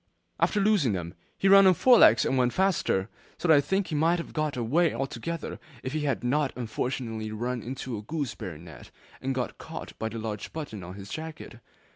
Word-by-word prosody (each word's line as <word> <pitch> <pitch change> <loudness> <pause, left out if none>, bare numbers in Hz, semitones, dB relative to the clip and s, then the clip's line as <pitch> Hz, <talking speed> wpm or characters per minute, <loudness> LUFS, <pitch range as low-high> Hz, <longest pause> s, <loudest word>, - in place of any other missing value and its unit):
After 210 - +2
losing 195 - +3
them, 85 -2 -4 0.2
he 195 - +1
ran 195 0 +8
on 185 - +6
four 245 +6 +6
legs 110 -1 +7
and - - +1
went 125 -2 +2
faster, 185 - +1 0.3
so 160 - -2
that 160 - +7
I - - +5
think 190 +7 0
he - - -4
might 165 +4 +3
have 170 - -6
got 155 -3 -1
away 150 +9 +2
altogether 135 +5 -4 0.2
if 130 - -4
he 155 -1 -1
had 140 -3 -1
not 140 +3 +1
unfortunately 115 -2 -3
run 120 +3 -3
into 130 0 -5
a - - -7
gooseberry 120 - -4
net, 80 -4 -12 0.3
and 135 0 -2
got 125 -1 -3
caught - - -8
by 110 - -2
the 115 - -6
large 110 -2 -5
buttons 145 -11 -6
on 90 +1 -8
his 100 0 -9
jacket. 155 -6 -7
130 Hz, 205 wpm, -27 LUFS, 110-160 Hz, 0.3 s, ran